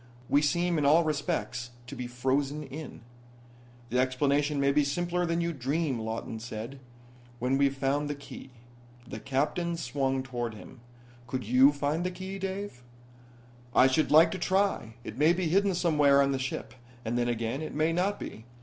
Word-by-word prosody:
We 145 Hz, -, +4 dB
seem 170 Hz, +2 st, +1 dB
in -, -, 0 dB
all 155 Hz, +4 st, +5 dB
respects 145 Hz, -5 st, -2 dB, 0.2 s
to 140 Hz, -, -8 dB
be 125 Hz, -1 st, -5 dB
frozen 135 Hz, +4 st, -1 dB
in." 145 Hz, 0 st, -8 dB, 0.9 s
"The 125 Hz, -, +2 dB
explanation 140 Hz, +3 st, +1 dB
may 140 Hz, 0 st, +3 dB
be 150 Hz, +1 st, +3 dB
simpler 175 Hz, +5 st, -1 dB
than 170 Hz, +1 st, 0 dB
you 170 Hz, 0 st, -1 dB
dream," 140 Hz, 0 st, -1 dB
Lawton 110 Hz, 0 st, -4 dB
said. 115 Hz, +3 st, -7 dB, 0.6 s
"When 125 Hz, +3 st, 0 dB
we've 140 Hz, 0 st, +2 dB
found 145 Hz, +2 st, 0 dB
the 145 Hz, -, -2 dB
key." 140 Hz, -1 st, -11 dB, 0.6 s
The -, -, -6 dB
Captain 155 Hz, +6 st, -1 dB
swung 135 Hz, -2 st, -1 dB
toward 120 Hz, -4 st, -4 dB
him. 125 Hz, +4 st, -12 dB, 0.5 s
"Could 130 Hz, +1 st, -3 dB
you 125 Hz, +5 st, +6 dB
find 145 Hz, +3 st, -1 dB
the 180 Hz, -, 0 dB
key, 190 Hz, +2 st, -7 dB
Dave?" 195 Hz, -7 st, -5 dB, 0.9 s
"I -, -, +7 dB
should 130 Hz, +4 st, +2 dB
like 160 Hz, +2 st, +7 dB
to 190 Hz, -, -4 dB
try. 185 Hz, -, 0 dB
It 110 Hz, +3 st, -8 dB
may 155 Hz, +3 st, +5 dB
be 175 Hz, -2 st, -1 dB
hidden 195 Hz, +2 st, +2 dB
somewhere 150 Hz, -5 st, +4 dB
on 140 Hz, 0 st, +3 dB
the 135 Hz, -, -1 dB
ship, 130 Hz, 0 st, -4 dB, 0.3 s
and 115 Hz, +2 st, -1 dB
then 120 Hz, 0 st, +1 dB
again, 120 Hz, +3 st, -2 dB
it 155 Hz, -, -6 dB
may 155 Hz, +2 st, +2 dB
not 190 Hz, +4 st, 0 dB
be. 110 Hz, -, -8 dB
140 Hz, 175 wpm, -29 LUFS, 130-165 Hz, 0.9 s, I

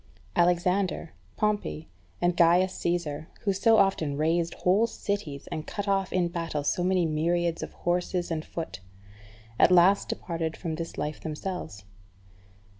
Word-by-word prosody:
Alexander, 180 Hz, 0 st, +1 dB, 0.2 s
Pompey, 210 Hz, -7 st, -1 dB, 0.3 s
and 175 Hz, 0 st, +2 dB
Gaius 175 Hz, +2 st, +4 dB
Caesar, 165 Hz, -3 st, -2 dB
who 200 Hz, -, +1 dB
so 220 Hz, +4 st, +4 dB
often 180 Hz, -8 st, +2 dB
razed 165 Hz, +2 st, +1 dB
whole 200 Hz, +6 st, +3 dB
cities, 200 Hz, -11 st, -4 dB
and 155 Hz, -, -4 dB
cut 205 Hz, -1 st, -4 dB
off 195 Hz, -1 st, +1 dB
in 180 Hz, -2 st, +2 dB
battle 165 Hz, -4 st, -3 dB
so 175 Hz, +4 st, 0 dB
many 185 Hz, -1 st, +2 dB
myriads 165 Hz, +2 st, 0 dB
of -, -, -6 dB
horse 175 Hz, +1 st, 0 dB
and 165 Hz, -3 st, -1 dB
foot, 165 Hz, -, -6 dB, 0.8 s
at -, -, +7 dB
last 180 Hz, +3 st, +5 dB
departed 165 Hz, -2 st, -3 dB
from 165 Hz, -3 st, -4 dB
this 165 Hz, +1 st, -5 dB
life 150 Hz, 0 st, -3 dB
themselves. 155 Hz, -, -5 dB
175 Hz, 140 wpm, -27 LUFS, 160-185 Hz, 0.8 s, at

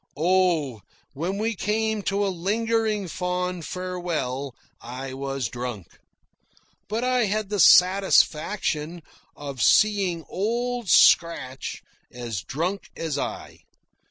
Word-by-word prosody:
Oh, 165 Hz, -, +1 dB, 0.3 s
when 170 Hz, +8 st, -3 dB
we 225 Hz, +2 st, -1 dB
came 220 Hz, +2 st, -1 dB
to 200 Hz, +1 st, 0 dB
a -, -, 0 dB
lingering 215 Hz, +2 st, 0 dB
fond 180 Hz, -1 st, -3 dB
farewell, 170 Hz, -8 st, -4 dB, 0.3 s
I 130 Hz, +2 st, -7 dB
was 135 Hz, -2 st, -3 dB
drunk. 120 Hz, -7 st, -7 dB, 0.9 s
But 220 Hz, +3 st, -2 dB
I 250 Hz, -2 st, +2 dB
had 210 Hz, 0 st, -2 dB
the 205 Hz, -1 st, -2 dB
satisfaction 175 Hz, -3 st, +3 dB, 0.3 s
of 140 Hz, -4 st, -7 dB
seeing 195 Hz, -, +3 dB
Old 235 Hz, +2 st, -2 dB
Scratch 135 Hz, -6 st, +3 dB, 0.3 s
as 120 Hz, -6 st, -5 dB
drunk 175 Hz, -, -3 dB
as 160 Hz, -3 st, -3 dB
I. -, -, -6 dB
180 Hz, 105 wpm, -24 LUFS, 140-205 Hz, 0.9 s, satisfaction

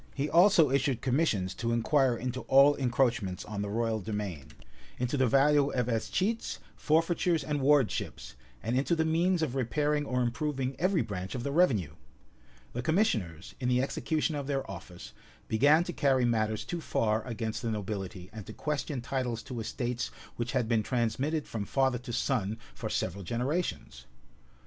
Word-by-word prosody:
He 140 Hz, +1 st, -1 dB
also 170 Hz, -5 st, +6 dB
issued 135 Hz, -2 st, +1 dB
commissions 125 Hz, -, +1 dB
to 115 Hz, -1 st, -2 dB
inquire 125 Hz, +1 st, +2 dB
into 125 Hz, +2 st, -3 dB
all 140 Hz, +2 st, +7 dB
encroachments 120 Hz, -7 st, 0 dB
on 105 Hz, -1 st, -4 dB
the 100 Hz, -, -3 dB
royal 110 Hz, 0 st, -1 dB
demesne; 100 Hz, -9 st, -4 dB, 0.5 s
into 125 Hz, +3 st, -1 dB
the 130 Hz, -2 st, +3 dB
value 140 Hz, +3 st, +4 dB
of 125 Hz, -2 st, +1 dB
escheats, 185 Hz, -, -1 dB, 0.2 s
forfeitures, 165 Hz, 0 st, +1 dB
and 145 Hz, -1 st, -2 dB
Wardships; 135 Hz, -, +1 dB, 0.3 s
and 115 Hz, +2 st, -1 dB
into 140 Hz, +6 st, +2 dB
the 160 Hz, -1 st, +1 dB
means 170 Hz, +2 st, +2 dB
of 140 Hz, -6 st, -1 dB
repairing 145 Hz, +3 st, 0 dB
or 125 Hz, 0 st, +1 dB
improving 135 Hz, +1 st, -2 dB
every 185 Hz, 0 st, +2 dB
branch 95 Hz, -1 st, -5 dB
of 120 Hz, -, -4 dB
the 140 Hz, -, -2 dB
revenue.[*] 130 Hz, -, +2 dB, 0.8 s
The 120 Hz, -, -2 dB
commissioners, 110 Hz, -, 0 dB
in 125 Hz, -2 st, -1 dB
the 125 Hz, +1 st, +3 dB
execution 155 Hz, +3 st, -1 dB
of 145 Hz, -2 st, -4 dB
their 135 Hz, -2 st, -1 dB
office, 90 Hz, -2 st, -9 dB, 0.3 s
began 145 Hz, +9 st, +4 dB
to 175 Hz, -, -5 dB
carry 135 Hz, -5 st, +2 dB
matters 110 Hz, -2 st, 0 dB
too 175 Hz, -1 st, -4 dB
far 110 Hz, -6 st, 0 dB
against 115 Hz, -2 st, -3 dB
the 115 Hz, -, -2 dB
nobility, 95 Hz, -4 st, -5 dB
and 110 Hz, -2 st, -7 dB
to -, -, -7 dB
question 150 Hz, -3 st, -3 dB
titles 125 Hz, -2 st, -2 dB
to 125 Hz, -3 st, -6 dB
estates 120 Hz, +2 st, -3 dB, 0.3 s
which 120 Hz, +1 st, -3 dB
had 125 Hz, -4 st, +1 dB
been 115 Hz, -1 st, +2 dB
transmitted 130 Hz, +7 st, -1 dB
from 110 Hz, -3 st, -4 dB
father 130 Hz, -1 st, +1 dB
to 125 Hz, 0 st, -8 dB
son 115 Hz, -3 st, 0 dB, 0.2 s
for -, -, -5 dB
several 95 Hz, +2 st, -2 dB
generations. 120 Hz, -, -3 dB
125 Hz, 165 wpm, -30 LUFS, 110-145 Hz, 0.8 s, all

